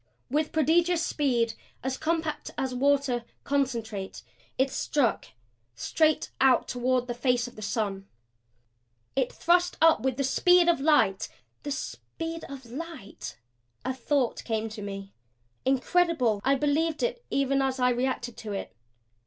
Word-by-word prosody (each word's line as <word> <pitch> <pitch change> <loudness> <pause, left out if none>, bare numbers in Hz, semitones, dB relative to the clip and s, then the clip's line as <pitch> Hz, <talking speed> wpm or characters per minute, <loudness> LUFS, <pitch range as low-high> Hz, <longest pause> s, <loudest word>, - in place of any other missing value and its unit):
With 300 +2 +1
prodigious 330 +2 +3
speed, 240 -6 +1 0.3
as 265 0 -1
compact 320 0 -2
as 260 -1 -1
water, 270 -2 +2 0.2
CONCENTRATE, 230 -8 -2 0.3
it 265 +1 +2
struck 270 -7 0 0.5
straight 310 - +1
out 260 -2 +5
toward 250 0 0
the 245 - -3
face 245 0 +1
of 245 - -12
the 215 - -9
sun. 200 -3 -2 1.1
It 265 -2 +1
thrust 355 +1 +2
up 325 0 +5
with 260 -1 0
the 275 - +1
speed 355 +6 +4
of 340 -5 +4
light 250 -11 +3 0.3
the 290 - -5
speed 330 +3 -5
of 270 -2 -9
light? 235 - -8 0.5
A 260 - 0
thought 260 0 0
came 225 -1 -2
to 215 0 -8
me; 195 -1 -6 0.5
incredible 265 - +2
I 275 +1 +4
believed 305 +3 +1
it 485 0 -1
even 275 0 +1
as 265 -1 0
I 250 0 +4
reacted 245 -1 -1
to 210 -2 -5
it. 95 - -5
265 Hz, 140 wpm, -28 LUFS, 235-305 Hz, 1.1 s, out